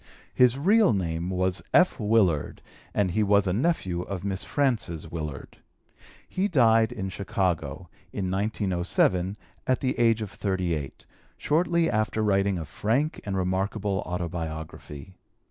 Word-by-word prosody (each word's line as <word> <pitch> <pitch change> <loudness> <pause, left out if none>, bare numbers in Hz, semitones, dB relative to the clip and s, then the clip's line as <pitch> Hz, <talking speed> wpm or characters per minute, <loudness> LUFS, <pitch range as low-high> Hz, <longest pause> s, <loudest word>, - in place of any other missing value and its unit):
His 125 0 +4
real 200 - +4
name 85 -2 -2
was 95 0 0
F. 180 -5 +4
Willard 105 -8 +1 0.3
and 100 -3 +1
he 110 - +1
was 100 -1 +3
a 90 - 0
nephew 100 - 0
of 95 0 -5
Miss 100 0 -2
Frances 115 - -1
Willard. 75 -4 -6 0.7
He 190 +2 0
died 115 - +4
in 95 -6 -4
Chicago, 90 -4 -2 0.2
in 95 -2 -3
1907, 95 -1 0 0.3
at 130 - +2
the 130 -2 -1
age 115 -2 +3
of 100 - -7
38, 90 -9 -3 0.3
shortly 170 +2 +2
after 110 -2 0
writing 100 -2 +2
a 80 - -4
frank 120 - -1
and 95 -1 -1
remarkable 95 +2 -1
Autobiography. 85 -1 -6
100 Hz, 130 wpm, -26 LUFS, 90-115 Hz, 0.7 s, His